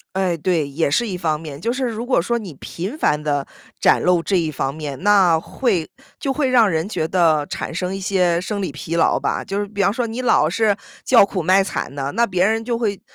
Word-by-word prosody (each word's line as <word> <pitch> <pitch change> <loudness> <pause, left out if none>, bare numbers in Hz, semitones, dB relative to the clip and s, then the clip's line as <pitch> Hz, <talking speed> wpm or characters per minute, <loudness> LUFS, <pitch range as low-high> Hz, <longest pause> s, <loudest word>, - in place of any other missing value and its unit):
哎， 185 -3 +1
对， 165 -2 0
也 140 +2 -1
是 235 +11 +1
一 190 - -3
方 155 -3 -1
面， 150 -2 -9
就 235 - 0
是 260 0 -2
如 230 -1 -3
果 250 -8 +2
说 235 +6 -1
你 195 -7 -8
频 190 - -6
繁 150 - +1
地 145 -2 -1 0.3
展 - - +4
露 180 -2 +2
这 195 - 0
一 160 -2 -1
方 135 -1 -2
面， 150 -4 -6
那 195 -5 +5
会 190 -3 -1 0.3
就 270 -1 -1
会 275 -3 0
让 235 -5 +5
人 160 +3 -1
觉 160 -6 -2
得 165 -5 +2
产 - - -5
生 185 +2 -3
一 - - -5
些 180 -3 +1
生 200 +2 -3
理 175 -6 -3
疲 160 +3 -5
劳 165 - +3
吧， - - -2
就 195 +1 -3
是 205 - -2
比 205 0 -3
方 195 +2 +2
说 240 -1 -1
你 230 +3 -4
老 160 -10 +3
是 215 +2 +2 0.3
叫 240 -5 +6
苦 185 -4 -3
卖 190 +3 +4
惨 185 - -4
的， 140 0 -3
那 235 +4 +3
别 185 -3 +1
人 225 +1 0
就 235 -1 -1
会 205 -5 -1
185 Hz, 260 characters per minute, -20 LUFS, 160-220 Hz, 0.3 s, 叫